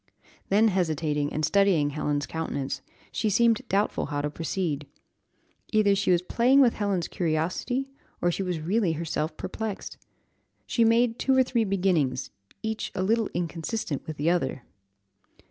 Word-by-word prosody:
Then 215 +3 +5
hesitating, 155 -5 0
and 155 0 0
studying 185 -7 +3
Helen's 145 -1 -1
countenance, 140 -4 -3 0.3
she 215 - 0
seemed 230 +3 +3
doubtful 200 +2 +1
how 145 -1 -2
to 150 0 -2
proceed. 160 -3 -2 0.8
Either 215 -2 +4
she 200 0 0
was 175 -1 +3
playing 250 +8 +3
with 250 -4 +6
Helen's 200 -5 -1
curiosity, 180 +11 -1 0.3
or 175 - +2
she 185 - -3
was 180 -3 -2
really 180 +2 +1
herself 160 0 -3
perplexed. 210 +2 -5 0.7
She 235 - +2
made 230 +1 +3
two 265 -1 +2
or 260 - +6
three 240 -3 0
beginnings, 175 -10 0 0.3
each 220 0 -3
a 185 - 0
little 220 +2 +1
inconsistent 170 - -3
with 155 -1 -5
the 155 +4 +2
other. 135 -7 -1
180 Hz, 145 wpm, -27 LUFS, 155-220 Hz, 0.8 s, with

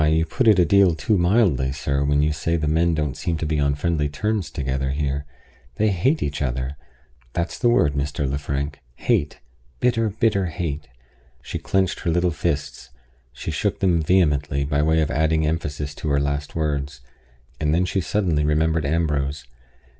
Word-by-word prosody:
you 80 +1 +3
put 125 +7 0
it 105 -3 +7
a 90 - +5
deal 95 -1 +4
too 105 +6 +1
mildly, 85 - +2
sir, 70 0 -1
when 70 +1 +2
you 75 0 +1
say 80 +3 -1
the 75 -2 -2
men 80 +2 +2
don't 75 -3 -1
seem 85 -2 -2
to 80 - -3
be 75 -1 0
on 70 -1 +2
friendly 75 -1 0
terms 105 +4 -2
together 65 -1 -2
here. 70 0 -2 0.5
They 110 +7 +2
hate 105 - +1
each 70 0 -3
other. 65 +1 -2 0.6
That's 85 0 -2
the 120 - +3
word, 80 -11 +3
Mr. 70 0 -2
Lefrank 70 +1 -3 0.2
hate; 70 - 0 0.4
bitter, 115 -3 +2
bitter, 105 - -12
bitter 105 -4 +2
hate!" 75 -4 -4 0.6
She - - -5
clinched 95 -1 0
her 85 - -2
little 85 +1 +2
fists; 75 -6 -3 0.4
she 65 - -5
shook - - -1
them 85 -4 +2
vehemently, 75 -4 +2
by 70 0 0
way 80 +1 +3
of 75 -1 -1
adding 80 +1 +1
emphasis 75 -2 -2
to 75 - -4
her 70 0 +2
last 70 +1 -2
words; 70 -3 -2 0.6
and 75 -1 +1
then 85 +4 +2
she 95 +1 -1
suddenly 85 -6 0
remembered 80 0 +1
Ambrose. 75 -4 -1
75 Hz, 180 wpm, -23 LUFS, 70-85 Hz, 0.6 s, it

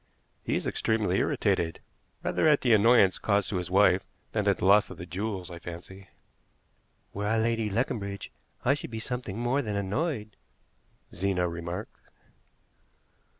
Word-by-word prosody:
"He - - -1
is - - -2
extremely 105 -4 +1
irritated, 85 -6 0 0.4
rather - - +1
at 150 -2 +5
the 120 -3 +4
annoyance 110 -3 +5
caused 100 -2 +1
to 95 - 0
his 90 -1 -3
wife 95 0 +4 0.3
than - - -1
at - - +3
the - - -2
loss 100 +2 +5
of 95 - -9
the 85 - -7
jewels, 95 +1 -4
I 85 - -8
fancy." 90 +3 -9 1.1
"Were 105 +1 -2
I 110 +2 +2
Lady 115 -1 +1
Leconbridge 100 -3 -2 0.3
I 130 - +5
should 145 - -5
be 110 -1 -5
something 120 -4 -4
more 120 +4 +1
than 105 -5 -3
annoyed," 105 - -2 0.8
Zena 90 0 0
remarked. 85 +4 -6
100 Hz, 150 wpm, -28 LUFS, 95-115 Hz, 1.1 s, at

